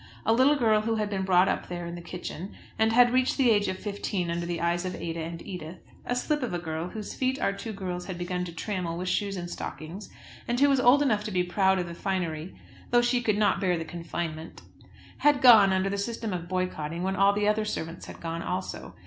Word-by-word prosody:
A 225 - +4
little 260 +5 +5
girl 220 -6 +3
who 225 +1 0
had 210 -1 -1
been 195 -1 -1
brought 185 0 +5
up - - -1
there 175 -1 -5
in 170 - -6
the 175 - -7
kitchen, 180 +2 -7 0.2
and 220 0 +4
had 245 +1 +5
reached 255 0 +2
the 255 -4 +4
age 205 -2 +3
of 185 0 -2
fifteen 200 -3 -3
under 170 0 -2
the 170 -1 -2
eyes 170 +1 0
of 185 -1 -3
Ada 165 0 -4
and 165 +1 -5
Edith, 180 -3 -7 0.3
a 245 - 0
slip 295 +4 0
of 240 -8 -2
a - - 0
girl, 165 0 -4
whose 215 0 -6
feet 260 +1 -1
our 195 - +1
two 225 +3 -6
girls 180 -3 -5
had 185 -3 -5
begun 180 0 -2
to 170 - -7
trammel 170 -1 -3
with 180 +1 -4
shoes 195 +2 0
and 175 -1 -4
stockings, 175 +3 -7 0.4
and 240 +1 0
who 285 +1 +5
was 275 -2 +3
old 255 +3 +6
enough 215 -7 +1
to 215 - -4
be 180 -2 +1
proud 190 +2 +2
of 180 - -1
the 170 - -6
finery 175 -2 -3 0.3
though 240 0 +4
she 245 0 +2
could 215 -3 +1
not 210 0 +2
bear 180 -3 +2
the 165 - -4
confinement, 165 -1 -6 0.6
had 290 -1 +4
gone 225 -7 +8
under 190 0 +1
the 200 0 -2
system 225 0 -3
of 175 -1 -5
boycotting, 175 -3 -2
when 190 +1 0
all 195 +1 +5
the 205 0 0
other 215 +1 +2
servants 170 -5 -5
had - - -10
gone 165 0 -4
also. 185 +2 -4
190 Hz, 240 wpm, -27 LUFS, 175-220 Hz, 0.6 s, gone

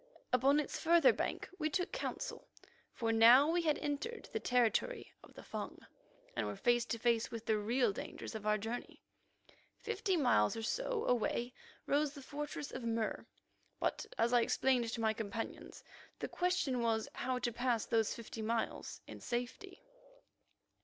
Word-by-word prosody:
Upon 270 +4 +5
its 300 - -3
further 330 -3 +6
bank - - -2
we 310 -1 +1
took 360 +4 -1
counsel, - - -4 0.4
for 230 -2 -1
now 240 +7 +7
we 345 +1 +2
had 310 -3 +2
entered 295 +12 -3
the 445 - 0
territory 250 - +1
of - - -16
the - - -10
Fung, - - -6 0.5
and - - -1
were - - -4
face 240 -2 +2
to 230 - -2
face 230 -1 +2
with 230 -1 -6
the 215 -1 +2
real 230 +1 +2
dangers - - -6
of 215 -1 -5
our 210 0 +4
journey. 225 +4 -6 0.7
Fifty 410 -4 -1
miles 105 - +3
or 225 - -4
so - - -1
away 245 0 0 0.3
rose 290 0 +1
the 280 - -9
fortress 290 +1 -5
of 255 - -5
Mur, 225 -1 -2 0.5
but, - - -1
as 235 +2 +2
I 240 - +6
explained 245 -1 +2
to 230 - -3
my 220 -1 +2
companions, 220 +1 -5 0.3
the - - -3
question 355 -9 0
was 225 -2 +1
how 255 0 -1
to 240 -1 -1
pass 240 -1 0
those 225 -2 +1
fifty 230 -1 -7
miles 225 +1 -2
in - - -9
safety. 245 0 -5
245 Hz, 165 wpm, -35 LUFS, 225-295 Hz, 0.7 s, now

